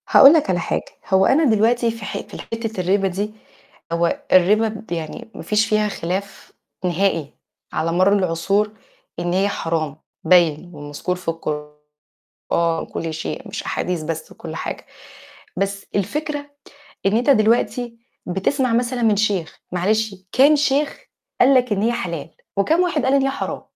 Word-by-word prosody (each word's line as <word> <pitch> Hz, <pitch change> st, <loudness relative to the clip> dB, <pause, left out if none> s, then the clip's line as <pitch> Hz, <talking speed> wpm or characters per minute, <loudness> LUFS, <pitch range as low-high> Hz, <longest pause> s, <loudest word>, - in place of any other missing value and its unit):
هاقول 275 Hz, +3 st, +9 dB
لك 310 Hz, -10 st, +2 dB
على 180 Hz, -2 st, +2 dB
حاجة، -, -, -2 dB, 0.2 s
هو 190 Hz, 0 st, +4 dB
أنا 310 Hz, +4 st, +4 dB
دلوقتي 230 Hz, -1 st, +3 dB
في 225 Hz, -2 st, -8 dB
ح -, -, -4 dB
في -, -, -9 dB
ال -, -, -6 dB
حتة 225 Hz, -3 st, -4 dB
الرِبا 195 Hz, +2 st, +2 dB
دي 200 Hz, +3 st, -3 dB, 0.6 s
هو 170 Hz, 0 st, 0 dB
الرِبا 205 Hz, +5 st, +5 dB
د 220 Hz, -1 st, -8 dB
يعني 165 Hz, +6 st, -5 dB
ما -, -, -7 dB
فيش 215 Hz, +1 st, +2 dB
فيها 215 Hz, 0 st, +2 dB
خِلاف 195 Hz, +1 st, -5 dB, 0.3 s
نِهائي 175 Hz, -4 st, 0 dB, 0.4 s
على 160 Hz, +2 st, 0 dB
مَر 185 Hz, +4 st, +4 dB
العُصور 195 Hz, +3 st, +1 dB, 0.5 s
إن 175 Hz, 0 st, -1 dB
هي 195 Hz, +2 st, +2 dB
حرام 160 Hz, -5 st, -2 dB, 0.3 s
باين، 170 Hz, -1 st, +3 dB
ومَذكور 145 Hz, +4 st, -4 dB
في 180 Hz, -, -13 dB
القرآن 150 Hz, -2 st, -6 dB, 0.9 s
كل 165 Hz, -1 st, -3 dB
شيء 160 Hz, -, -5 dB
مش -, -, -5 dB
أحاديث 180 Hz, -3 st, -2 dB
بس 160 Hz, 0 st, -5 dB
وكل -, -, -8 dB
حاجة، -, -, -5 dB, 0.7 s
بس 195 Hz, +1 st, -2 dB
الفكرة 290 Hz, -, -2 dB, 0.6 s
إن 200 Hz, +3 st, +3 dB
أنت 245 Hz, +4 st, +1 dB
دلوقتي 230 Hz, 0 st, +2 dB, 0.3 s
بتسمع 230 Hz, +8 st, 0 dB
مثلًا 245 Hz, +1 st, 0 dB
من 220 Hz, -2 st, +4 dB
شيخ 200 Hz, -6 st, -1 dB
معلش 210 Hz, +4 st, 0 dB, 0.2 s
كام 280 Hz, +4 st, +6 dB
شيخ 285 Hz, 0 st, +1 dB, 0.4 s
قال 265 Hz, +2 st, +6 dB
لك 250 Hz, -2 st, +3 dB
إن 200 Hz, -1 st, +1 dB
هي 230 Hz, +2 st, +2 dB
حلال، 170 Hz, -10 st, -4 dB, 0.3 s
وكام 315 Hz, -, +3 dB
واحد 345 Hz, -7 st, +1 dB
قال 260 Hz, -, +2 dB
إن 280 Hz, -, +4 dB
هي 270 Hz, -, +1 dB
حرام؟ 270 Hz, -, -4 dB
200 Hz, 160 wpm, -21 LUFS, 175-235 Hz, 0.9 s, هاقول